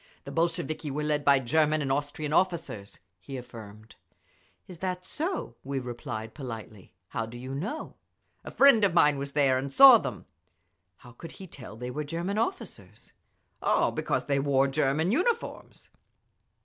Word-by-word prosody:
"The - - -8
Bolsheviki 165 -2 -1
were 150 +2 -3
led 150 -1 0
by 140 0 +5
German 155 +4 +2
and 140 -2 -2
Austrian 145 +2 -2
officers," 165 - -1 0.2
he 130 +9 -8
affirmed. 110 -3 -11 0.7
"Is 180 -3 -11
that 180 -1 -3
so?" 350 +5 -3
we 140 +1 -4
replied, 120 -3 -6
politely. 110 - -9
"How 115 - -3
do 120 +2 -9
you 130 +2 -7
know?" 195 - -5 0.5
"A - - -7
friend 275 -6 +5
of 190 -4 +3
mine 150 -4 +4
was 140 0 -6
there 135 -3 +3
and 135 +1 -5
saw 265 - +9
them." - - -6 0.7
"How 120 - -15
could 160 +7 -11
he 190 - -10
tell 125 - -11
they 125 +1 -5
were 150 +4 -3
German 170 +7 -3
officers?" 370 - -5 0.5
"Oh, - - +2
because - - -2
they 140 -1 +1
wore 135 -1 +2
German 150 +5 +1
uniforms!" 430 - -2
145 Hz, 160 wpm, -28 LUFS, 125-170 Hz, 0.7 s, saw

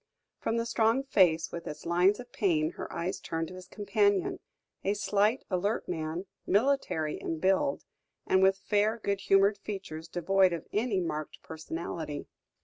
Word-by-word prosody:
From 225 - -1
the 230 - 0
strong 230 +2 +2
face, 180 -11 +3
with 170 - -6
its 150 - -7
lines 180 +5 +3
of 245 0 -10
pain, 165 -8 +1
her - - -7
eyes 170 +2 -3
turned 165 0 -3
to - - -9
his 185 0 -10
companion 205 -1 +1 0.4
a 200 +2 +1
slight, 210 +4 +1
alert 200 +4 0
man, 165 +1 -3 0.2
military 200 - +1
in 165 - -3
build 195 - +1 0.4
and 190 - +3
with 190 0 +5
fair, 210 +3 +1
good 200 -3 -2
humoured 195 +1 +4
features 185 -6 -6
devoid 185 +2 +3
of 170 - -4
any 210 -2 +1
marked 155 -3 -4
personality. 160 -1 -5
190 Hz, 155 wpm, -30 LUFS, 165-210 Hz, 0.4 s, with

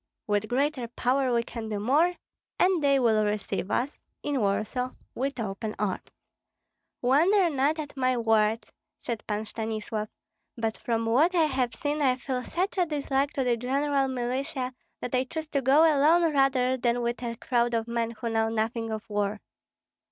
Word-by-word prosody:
With 205 0 0
greater 265 0 0
power 255 +2 0
we 235 -1 +2
can 225 -1 -6
do 210 -1 -2
more, 300 +11 +3 0.4
and 360 -4 +3
they 280 -1 +4
will 225 -4 +3
receive 205 -2 -2
us 255 +4 0 0.3
(in 285 -2 0
Warsaw) 215 +5 -1 0.2
with 270 +1 -3
open 215 0 -4
arms." 205 -3 -1 1.0
"Wonder 335 +8 +4
not 285 +3 +1
at 300 -2 -6
my 255 -1 +1
words," 225 -1 +1 0.3
said 230 -3 -4
Pan 210 0 -2
Stanislav, 215 0 -4 0.5
"but 225 -1 -1
from 230 -1 -1
what 295 +11 +3
I 335 - +5
have 260 -4 -1
seen 295 +1 -2
I 260 -3 +3
feel 255 -1 -3
such 375 +6 -2
a 355 - +3
dislike 280 -2 0
to 270 - 0
the 245 -2 +1
general 275 +3 +1
militia 255 +1 -2 0.3
that 245 - -5
I 255 +1 +2
choose 315 +3 -6
to 280 - 0
go 270 +4 +5
alone 320 +2 +4
rather 260 -2 +3
than 240 -1 0
with 235 +1 -2
a 235 -1 -3
crowd 240 -1 +1
of 225 0 -1
men 235 -1 -1
who 230 0 -5
know 225 0 +1
nothing 225 +1 -1
of 220 +1 -5
war." 205 -1 -1
250 Hz, 175 wpm, -27 LUFS, 225-280 Hz, 1.0 s, I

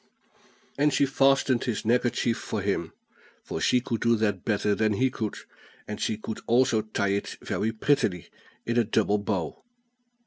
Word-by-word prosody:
And 150 +1 +4
she 140 - +3
fastened 135 -2 +2
his 115 -4 -2
neckerchief 120 0 +1
for 110 - -4
him; 90 -5 -1 0.5
for - - -5
she 125 - +3
could 120 -3 -3
do 115 0 +4
that 105 -4 -1
better 105 -1 +1
than 110 +1 +1
he 130 +5 +1
could, 110 -4 -4 0.5
and 105 - -6
she 110 - 0
could 110 0 -6
also 120 -2 +3
tie 105 -2 -2
it 100 +1 -2
very 110 - -1
prettily 110 - 0 0.4
in 115 +1 -1
a - - +4
double 105 -1 +1
bow. 100 -5 -3
110 Hz, 165 wpm, -27 LUFS, 105-120 Hz, 0.5 s, And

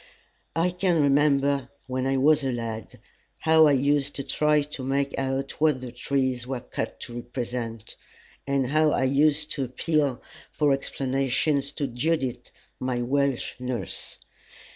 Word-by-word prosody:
I 170 +2 +2
can 180 -2 +1
remember 140 -2 +3 0.2
when 130 0 -2
I 135 0 +1
was 150 +2 +4
a 135 - 0
lad 115 -2 -5 0.4
how 160 -1 +6
I 145 - +4
used 140 +1 +1
to 140 - -3
try 150 +1 +2
to 145 -2 -7
make 140 +1 0
out 135 +1 -3
what 155 -4 +3
the 125 -1 -7
trees 130 0 -1
were 130 -1 -2
cut - - -5
to 120 - -7
represent, 120 -2 -5 0.5
and 140 -1 +1
how 155 +3 +3
I - - +1
used 150 +3 +2
to 140 -3 -1
appeal 140 +1 0 0.3
for 145 -2 +2
explanations 135 +1 0
to 145 - -2
Judith, 130 -1 -1 0.3
my 125 -1 -1
Welsh 140 0 0
nurse. 125 -6 -4
135 Hz, 145 wpm, -26 LUFS, 130-145 Hz, 0.5 s, how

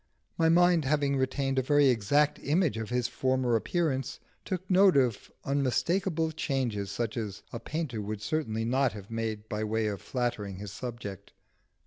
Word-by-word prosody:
My 165 0 +3
mind, 175 -1 +5
having 140 0 +1
retained 135 0 0
a - - +3
very 145 +1 +4
exact 130 +6 +2
image 155 - +1
of 110 -1 -4
his 125 -1 0
former 130 -2 +1
appearance, 135 +2 -1 0.2
took 185 -1 -4
note 190 -2 +5
of 125 -5 +1 0.2
unmistakeable 160 +5 +1
changes 130 -10 -2
such 115 +2 -3
as 105 -4 -4
a 115 - -4
painter 140 -4 -3
would 105 0 -5
certainly 115 -4 -1
not 130 +2 +2
have 105 0 -10
made 110 -2 -3
by 105 0 -3
way 110 +1 0
of 105 -2 -3
flattering 120 -6 -2
his 100 +1 -7
subject. 105 -4 -7
130 Hz, 160 wpm, -29 LUFS, 110-150 Hz, 0.2 s, mind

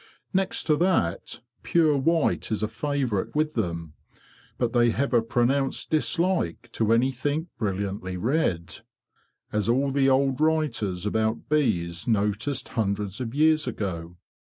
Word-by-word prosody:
Next 190 0 0
to 155 - +3
that, 145 - 0 0.2
pure 160 -3 +3
white 160 -2 +1
is 110 -1 -1
a - - +1
favourite 125 -4 -2
with 155 0 +1
them; 85 -7 -3 0.6
but 120 -2 -1
they 120 -1 +4
have 130 +5 -1
a 120 - +5
pronounced 125 +4 0
dislike 160 - 0
to 110 -1 0
anything 135 +7 +1
brilliantly 95 -3 -3
red, 95 - -1 0.7
as 105 +1 0
all 135 +3 +2
the 135 0 +3
old 135 +1 +2
writers 125 - 0
about 110 +2 -1
bees 90 - 0
noticed 110 +5 0
hundreds 100 0 -2
of 120 0 -4
years 155 +1 +3
ago. 85 -4 -4
120 Hz, 130 wpm, -26 LUFS, 100-145 Hz, 0.7 s, a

